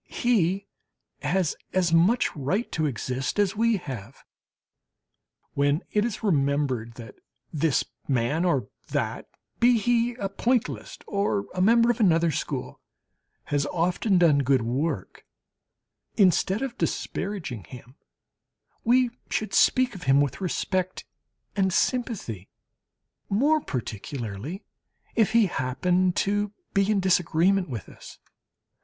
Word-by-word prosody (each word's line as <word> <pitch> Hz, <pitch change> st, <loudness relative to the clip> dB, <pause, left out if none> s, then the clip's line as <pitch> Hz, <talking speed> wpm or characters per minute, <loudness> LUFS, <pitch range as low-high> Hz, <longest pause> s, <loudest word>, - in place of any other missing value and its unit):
He 200 Hz, -5 st, +1 dB, 0.6 s
has 165 Hz, +3 st, 0 dB, 0.2 s
as 180 Hz, -3 st, +2 dB
much 185 Hz, +9 st, +3 dB
right 170 Hz, -, -1 dB
to 155 Hz, -2 st, 0 dB
exist 130 Hz, -, -3 dB
as 205 Hz, -1 st, +2 dB
we 230 Hz, 0 st, +2 dB
have. 130 Hz, -, -8 dB, 1.3 s
When 145 Hz, +4 st, +1 dB
it 210 Hz, -, +2 dB
is 230 Hz, -1 st, -3 dB
remembered 140 Hz, -, 0 dB
that 115 Hz, -3 st, -11 dB, 0.4 s
this 155 Hz, -1 st, +1 dB, 0.2 s
man 135 Hz, +5 st, +1 dB
or 140 Hz, -, +1 dB, 0.2 s
that -, -, -2 dB, 0.3 s
be 240 Hz, 0 st, +5 dB
he 235 Hz, +2 st, +1 dB
a 200 Hz, -5 st, -3 dB
pointilliste 235 Hz, +4 st, -2 dB
or 200 Hz, 0 st, 0 dB
a 180 Hz, -, -1 dB
member 230 Hz, +4 st, +5 dB
of 240 Hz, -, -5 dB
another 170 Hz, -5 st, +3 dB
school -, -, -4 dB, 0.7 s
has 145 Hz, 0 st, +1 dB
often 180 Hz, +5 st, +1 dB
done 165 Hz, -5 st, +5 dB
good 135 Hz, -3 st, +2 dB
work, 130 Hz, -, -3 dB, 0.9 s
instead 190 Hz, -, +3 dB
of 260 Hz, -3 st, -5 dB
disparaging 155 Hz, -, -3 dB
him, 125 Hz, +5 st, -12 dB, 0.9 s
we 245 Hz, +1 st, +3 dB, 0.2 s
should 215 Hz, -, -2 dB
speak 255 Hz, -1 st, +4 dB
of 185 Hz, -3 st, -9 dB
him 135 Hz, +1 st, +5 dB
with 145 Hz, +4 st, 0 dB
respect 185 Hz, 0 st, -2 dB, 0.5 s
and 190 Hz, -2 st, +2 dB
sympathy, 195 Hz, -, -1 dB, 0.8 s
more 290 Hz, +10 st, +3 dB
particularly 120 Hz, -, -5 dB, 0.5 s
if 220 Hz, -1 st, +2 dB
he 230 Hz, -2 st, +5 dB
happen 180 Hz, +4 st, +1 dB
to 205 Hz, +2 st, 0 dB, 0.2 s
be 195 Hz, +1 st, +2 dB
in 210 Hz, -2 st, +3 dB
disagreement 180 Hz, 0 st, +2 dB
with 115 Hz, -7 st, -6 dB
us. -, -, -13 dB
180 Hz, 120 wpm, -26 LUFS, 140-210 Hz, 1.3 s, be